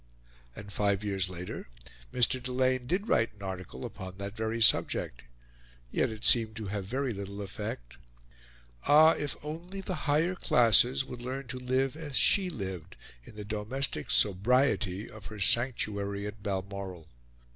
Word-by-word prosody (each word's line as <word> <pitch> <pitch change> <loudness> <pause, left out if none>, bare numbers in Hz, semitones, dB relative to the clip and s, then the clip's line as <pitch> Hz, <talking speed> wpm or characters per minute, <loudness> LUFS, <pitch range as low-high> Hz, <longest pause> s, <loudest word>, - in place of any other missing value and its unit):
And 100 -1 -9
five 100 0 +1
years 95 -3 0
later 90 -6 -6 0.4
Mr. 125 +1 +2
Delane 130 0 0
did 195 - 0
write 115 -2 +2
an 100 - -12
article 95 -2 -6
upon 95 0 -8
that 100 +1 -6
very 110 +1 -2
subject. 110 - +2 0.7
Yet - - +1
it 110 0 -7
seemed 110 -2 +4
to 110 -1 -5
have 100 -1 -3
very 130 +4 -1
little 100 0 -6
effect. - - -6 0.9
Ah! 155 +2 +8
if 145 -3 -2
only 170 +6 -6
the 185 -5 -5
Higher 160 +5 +3
Classes 125 - +4
would 125 -2 -8
learn 130 +3 -4
to 130 - -4
live 130 +2 0
as 150 -4 -2
she 190 -2 +4
lived 95 - -6 0.3
in - - -13
the 105 -1 -7
domestic 105 - -3
sobriety 100 - +2
of 110 -1 -11
her 110 -1 -9
sanctuary 100 -3 0
at 105 +1 -7
Balmoral! 95 -3 -4
110 Hz, 150 wpm, -30 LUFS, 100-130 Hz, 0.9 s, Ah